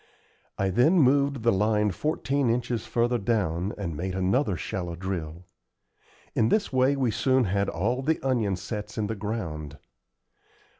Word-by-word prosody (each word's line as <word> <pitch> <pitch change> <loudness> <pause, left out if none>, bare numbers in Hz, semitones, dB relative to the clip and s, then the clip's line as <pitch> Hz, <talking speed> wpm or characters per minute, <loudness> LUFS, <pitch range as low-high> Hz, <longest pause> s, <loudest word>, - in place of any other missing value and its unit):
I 95 - +1
then 140 - +4
moved 140 -3 +3
the 115 - +4
line 105 +1 +2
fourteen 140 - 0
inches 120 0 -1
further 120 0 +1
down 100 -4 0
and 90 -6 -4
made 90 +4 -3
another 95 - +1
shallow 85 0 -4
drill. 85 -2 -5 0.9
In 110 - +2
this 205 -9 +1
way 130 +2 +3
we 130 -4 +1
soon 130 +3 +2
had 100 -1 0
all 115 +10 -1
the 155 +4 0
onion 110 -7 +1
sets 105 +3 -6
in 110 - 0
the 110 - -2
ground. 85 -9 -5
105 Hz, 150 wpm, -26 LUFS, 95-130 Hz, 0.9 s, then